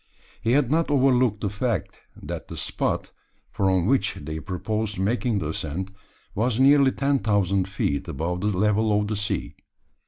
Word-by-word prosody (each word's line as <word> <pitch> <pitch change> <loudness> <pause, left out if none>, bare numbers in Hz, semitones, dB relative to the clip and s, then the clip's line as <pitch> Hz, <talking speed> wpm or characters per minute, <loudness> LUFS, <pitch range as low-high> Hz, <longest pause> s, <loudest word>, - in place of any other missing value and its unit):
He 115 - +1
had 135 -2 +2
not 165 +1 +2
overlooked 130 -6 +3
the 100 - 0
fact, 105 - -2 0.2
that - - -6
the - - -8
spot, - - -2 0.4
from 95 -3 +1
which 115 -3 +1
they 80 +1 -6
proposed 105 +4 -3
making 110 +4 0
the 80 -6 -2
ascent, 80 +5 -4 0.4
was 115 +3 0
nearly 140 0 +6
ten 140 0 +1
thousand 100 -2 +1
feet 70 -7 -1
above 85 +5 -3
the 105 - 0
level 105 +1 +2
of 105 - -1
the 110 - -2
sea. 105 0 -2
105 Hz, 160 wpm, -24 LUFS, 95-125 Hz, 0.4 s, nearly